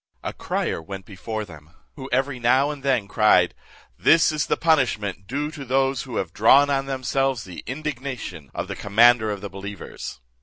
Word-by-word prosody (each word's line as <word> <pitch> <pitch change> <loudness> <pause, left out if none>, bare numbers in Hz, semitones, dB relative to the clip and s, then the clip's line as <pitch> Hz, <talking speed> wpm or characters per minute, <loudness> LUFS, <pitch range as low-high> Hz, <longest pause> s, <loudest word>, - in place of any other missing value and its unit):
A - - -4
crier - - -2
went 95 +3 -8
before 110 +2 -5
them, 80 -2 -15 0.2
who 135 -2 -8
every 130 +1 0
now 130 +5 +3
and 145 -2 -8
then 130 -7 +1
cried, 95 -4 +4 0.5
"This 165 -1 +5
is 155 -1 -1
the - - +1
punishment 110 - +1
due 145 +4 -2
to 150 -3 -8
those 135 0 +1
who 130 - -7
have 85 -4 -2
drawn 140 +6 +5
on 135 0 0
themselves 135 -1 -1
the 90 -2 -9
indignation 130 - -5
of - - -3
the - - -5
commander 110 +2 +4
of 100 -2 -4
the 100 - -6
believers." 100 -4 -8
125 Hz, 180 wpm, -23 LUFS, 100-135 Hz, 0.5 s, This